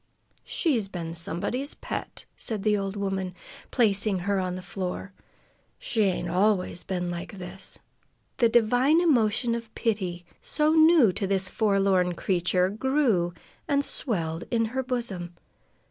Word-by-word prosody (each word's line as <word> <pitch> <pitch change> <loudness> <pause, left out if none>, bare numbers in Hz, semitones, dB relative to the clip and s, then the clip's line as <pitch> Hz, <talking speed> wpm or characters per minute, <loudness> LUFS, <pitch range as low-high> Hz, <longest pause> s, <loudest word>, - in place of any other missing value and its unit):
"She's 250 - +1
been 170 -4 -5
somebody's 195 - -2
pet," - - -6
said 215 -4 -2
the 215 -1 +3
old 195 0 -2
woman, 195 -2 -2 0.3
placing 210 -4 +2
her 200 -1 +1
on 185 -1 -2
the 185 - -7
floor. 190 +1 -5 0.6
"She 225 - -1
ain't 185 -2 0
always 185 0 +1
been 180 -2 -2
like 175 +4 -6
this." 180 +1 -6 0.6
The 235 - +4
divine 245 +7 +4
emotion 240 -8 +2
of 230 -1 -5
pity, 185 -6 -2 0.2
so 305 0 +1
new 315 - +6
to 195 +2 -2
this 190 -1 +1
forlorn 195 -4 +2
creature, 180 0 +1
grew 215 -6 +1 0.3
and 285 0 +2
swelled 165 - -3
in 230 -2 +2
her 265 - 0
bosom. 220 -9 -4
200 Hz, 135 wpm, -27 LUFS, 180-235 Hz, 0.6 s, new